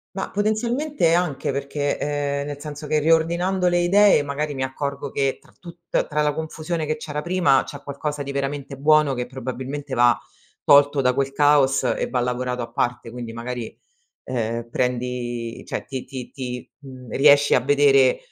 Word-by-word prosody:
Ma, 190 - -4
potenzialmente, 220 - 0
anche 170 -6 0
perché 140 +1 -2
ehm, 145 -1 -2
nel 145 -1 -6
senso 150 0 -7
che 155 +1 +1
riordinando 170 +4 +2
le 175 0 +2
idee 185 -1 +5
magari 145 +1 -3
mi 130 - -2
accorgo 140 +1 -4
che 135 -1 0
tra - - -23
tutt 170 -1 -3
tra 150 0 0
la 150 0 +1
confusione 160 +1 -4
che 155 +1 -1
c'era 150 -1 -5
prima, 175 -6 +3
c'è - - -10
qualcosa 145 +1 -4
di 140 - -5
veramente 140 0 -3
buono 150 0 +3
che 125 -1 -3
probabilmente 130 +2 -6
va 120 -1 +4 0.5
tolto 145 0 +5
da 125 -1 +2
quel 135 +1 -1
caos 145 -1 +3
e - - -1
va 125 - 0
lavorato 125 0 -2
a 115 - -8
parte, 120 0 -2
quindi 120 -1 -7
magari, 120 0 -6 0.5
ehm, 115 -1 -3
prendi 120 -2 -3
cioè - - -4
ti 130 -2 -5
ti 130 -3 -8
ti 125 -2 -6
mhmm, 130 -4 -12
riesci 145 +2 +5
a - - +5
vedere, 135 0 +4
140 Hz, 170 wpm, -22 LUFS, 125-155 Hz, 0.5 s, idee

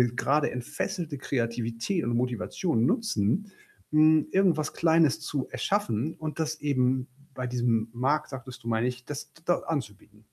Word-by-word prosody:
grade 145 +3 +2
entfesselte 150 +5 -3
Kreativität 115 - -1
und 120 0 0
Motivation 120 - 0
nutzen, 205 - +1 0.4
hm, 155 0 +5
irgendwas 175 -6 +2
Kleines 160 -3 +4
zu 150 -3 -3
erschaffen 160 - -1
und 155 +1 -5
das 155 0 -2
eben 130 -2 +1 0.3
bei 125 -1 -3
diesem 120 -2 +1
Markt, 135 +6 0
sagtest 130 -3 -8
du, 115 - -8
meine 115 +2 +2
ich, 125 0 -5
das 145 -1 -6
da 175 - +3
anzubieten. 105 -7 -5
135 Hz, 140 wpm, -28 LUFS, 120-160 Hz, 0.4 s, hm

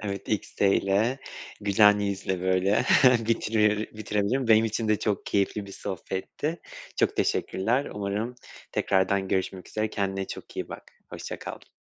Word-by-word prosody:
Evet, 100 -2 -5
XD 105 -1 -2
ile 105 +8 +1 0.4
güzel 105 0 +5
yüzle 95 -2 -2
böyle 95 +2 +2 0.4
bitire 105 -2 +2 0.2
bitirelim. 110 +4 -1
Benim 110 0 +6
için 110 0 -1
de 105 -1 +3
çok 105 -3 -1
keyifli 100 0 0
bir 100 - -10
sohbetti. 95 - -4 0.4
Çok - - +1
teşekkürler. 120 +9 +1
Umarım 105 +4 -2 0.4
tekrardan 95 0 +1
görüşmek 95 0 -2
üzere. 110 0 -2
Kendine 95 -1 -2
çok - - -9
iyi - - -3
bak. - - -10 0.2
Hoşça - - -6
kal. - - -9
105 Hz, 135 wpm, -27 LUFS, 95-110 Hz, 0.4 s, Benim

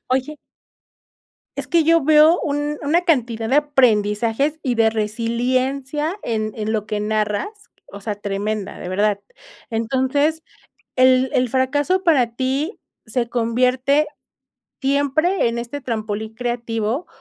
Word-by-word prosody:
Oye 285 +4 -3 1.2
es - - -5
que 335 -3 +3
yo 330 0 +4
veo 310 +3 +5
un 290 0 -2
una 325 +5 +2
cantidad 235 -9 0
de 270 - +3
aprendizajes 250 0 +2
y 250 -3 0
de 225 -1 +3
resiliencia 255 - -1
en 215 -2 -2
en 220 0 -2
lo 210 -2 -1
que 210 -1 -2
narras, 215 - -2 0.2
o 200 - -8
sea, 210 0 -4
tremenda, 205 0 -3
de - - -6
verdad. 200 +2 +1 0.5
Entonces, 265 +7 0 0.5
el 255 0 +4
el 250 -1 +2
fracaso 290 +8 +1
para 250 -9 +2
ti 275 - -2 0.3
¿se 235 +1 -1
convierte 250 +5 +1 0.7
siempre 285 +4 +1
en 235 0 -3
este 240 +5 -5
trampolín 220 -2 -4
creativo 235 +2 -2
255 Hz, 125 wpm, -20 LUFS, 220-290 Hz, 1.2 s, veo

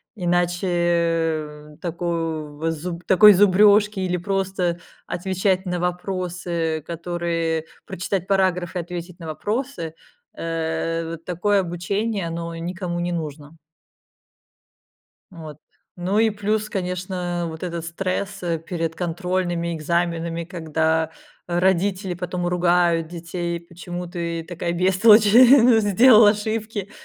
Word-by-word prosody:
иначе, 175 -1 0
э, 165 -3 -1
таков 165 -3 -3
зуб 170 +2 -6
такой 210 +3 +8
зубрёжки, 205 +2 +5
или 180 -1 -1
просто 185 -1 -1 0.3
отвечать 190 +1 -1
на 180 -1 -2
вопросы, 180 -3 -2
которые 170 -1 -2 0.2
прочитать 185 +1 -3
параграфы, 185 -2 +1
и - - -1
ответить 175 +1 -8
на 165 - -8
вопросы, 205 - -3 0.4
э, 165 0 -2
вот 165 0 -8
такое 200 +3 +1
обучение- 195 +3 -2
оно 165 0 -5
никому 175 +1 -4
не 175 0 -2
нужно. 155 -1 -6 1.7
Вот, 160 -5 -10 0.4
ну 185 +4 -1
и 225 0 +4
плюс, 210 +1 -1
конечно, 180 -2 -3
вот 160 +1 -9
этот 170 -2 -4
стресс, 185 +3 -3
э, 170 -2 -1
перед 165 0 -4
контрольными, 175 0 -2
экзаменами, 170 +1 -1
когда 160 -2 -1 0.4
родители 185 +2 +1
потом 180 0 -3
ругают 175 -2 +2
детей: 170 0 -4
"Почему 175 +1 -7
ты 170 -1 -4
такая 170 0 -4
бестолочь, 195 +5 +5 0.6
сделал 215 +2 +7
ошибки?" 210 -1 -1
175 Hz, 110 wpm, -22 LUFS, 165-190 Hz, 1.7 s, такой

